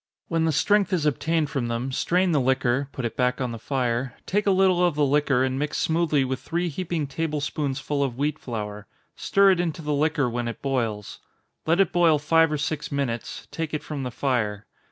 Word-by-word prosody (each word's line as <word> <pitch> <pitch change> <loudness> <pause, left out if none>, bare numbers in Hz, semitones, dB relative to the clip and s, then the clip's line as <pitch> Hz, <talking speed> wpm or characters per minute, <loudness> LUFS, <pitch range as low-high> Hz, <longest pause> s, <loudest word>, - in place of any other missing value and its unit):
When 165 -1 +1
the 160 - +2
strength 195 +5 +2
is 165 -4 +1
obtained 155 +1 0
from 125 -4 -1
them, 120 +3 -2
strain 180 +6 +1
the 150 -4 +2
liquor 130 +1 +1
put 130 - -4
it 115 - -3
back 125 +1 +1
on 125 -2 -2
the 115 - -6
fire 125 0 -1
take 205 +2 0
a - - +6
little 185 -2 +4
of 175 -4 +2
the 150 -1 +3
liquor, 140 -2 +2
and 130 0 -1
mix 150 0 -2
smoothly 160 -4 +1
with 130 0 -3
three 170 +5 -2
heaping 165 -1 -2
table 150 +2 -2
spoonsful 145 -1 -2
of 125 -3 -3
wheat 150 +2 -1
flour 105 -3 -6 0.3
stir 195 0 +4
it 185 - +1
into 165 -2 -2
the 150 0 -1
liquor 150 -1 +1
when 120 0 -2
it 115 - -5
boils. 115 -7 -2 0.5
Let 165 +3 +3
it 195 - +3
boil 170 -3 +4
five 165 +2 +3
or 150 - 0
six 150 +1 -3
minutes 130 -5 -3
take 160 -2 -3
it 150 - -4
from 150 -3 -5
the 125 - -3
fire. 110 -5 -1
145 Hz, 215 wpm, -25 LUFS, 130-165 Hz, 0.5 s, a